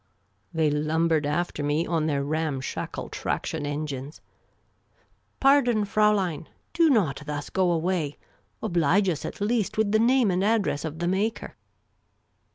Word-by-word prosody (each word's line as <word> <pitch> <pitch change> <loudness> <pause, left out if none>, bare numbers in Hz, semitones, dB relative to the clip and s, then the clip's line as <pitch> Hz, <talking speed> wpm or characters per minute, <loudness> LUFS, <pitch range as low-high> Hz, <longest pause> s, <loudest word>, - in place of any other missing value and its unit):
They 160 -3 +1
lumbered 155 +1 +1
after 150 +1 -2
me 145 +3 0
on 160 -2 0
their 140 -2 0
ramshackle 150 -2 -3
traction 145 - -3
engines. 145 -1 -5 0.6
" - - -41
Pardon, 245 -6 +4
Fraulein! 200 -6 +1 0.2
Do 330 -1 +4
not 185 - +2
thus 145 -1 -5
go 185 -2 +2
away! 165 -3 -1 0.5
Oblige 180 0 +2
us 160 -4 -3
at - - -6
least 215 0 0
with 215 -2 +2
the 220 - +3
name 240 -2 +3
and 180 +1 0
address 205 -8 +1
of 160 0 -5
the 175 +1 -2
maker." 200 +5 -1
170 Hz, 140 wpm, -26 LUFS, 150-210 Hz, 0.6 s, Pardon